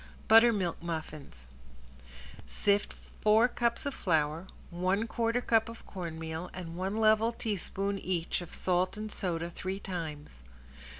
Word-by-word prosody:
~BUTTERMILK 220 -7 +5
MUFFINS~ 155 - -6 1.0
Sift 200 - +1 0.3
four 220 +3 +5
cups 235 0 -1
of 280 - -1
flour, 160 - 0 0.2
one 185 +5 +1
quarter 230 +1 0
cup 225 -1 +2
of 230 - -11
cornmeal, 165 -2 -5
and 170 -2 -6
one 190 +4 -2
level 220 +1 +4
teaspoon 200 -3 -2
each 180 -2 -1
of 175 - -9
salt 185 +2 +1
and 215 0 -5
soda 170 -3 -2
three 190 +3 -4
times. 160 - -6
185 Hz, 125 wpm, -31 LUFS, 165-215 Hz, 1.0 s, ~BUTTERMILK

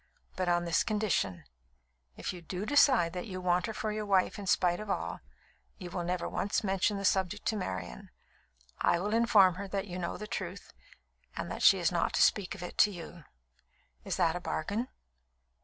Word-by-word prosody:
But 185 -1 -1
on 175 0 +2
this 170 - +2
condition 200 - -1 0.7
if - - -4
you 180 - -9
do 180 +4 -5
decide 260 - +4
that 180 +2 -5
you 185 -2 -5
want 180 +2 +1
her 220 - -4
for 215 - -2
your 210 0 -4
wife 195 0 +2
in 200 - -7
spite 175 -1 +2
of 215 -1 -7
all, 85 - -2 0.6
you 180 -2 -8
will 175 - -3
never 175 0 -2
once 205 +3 -1
mention 195 +1 +1
the 195 - -3
subject 190 +2 +1
to 220 - -1
Marian. 95 - -5 0.7
I - - +3
will 205 +4 -2
inform 210 -6 +5
her 200 - -5
that 195 +1 -3
you 180 -2 -6
know 170 - -3
the 210 - -6
truth 210 - -6 0.6
and - - -4
that - - -5
she - - +7
is - - +1
not - - 0
to - - +4
speak 200 -1 +2
of 185 - -8
it 180 - -8
to 210 - +7
you. 170 -4 -9 0.8
Is - - -2
that 165 0 +2
a - - -2
bargain?" 205 +8 -2
185 Hz, 200 wpm, -31 LUFS, 175-210 Hz, 0.8 s, she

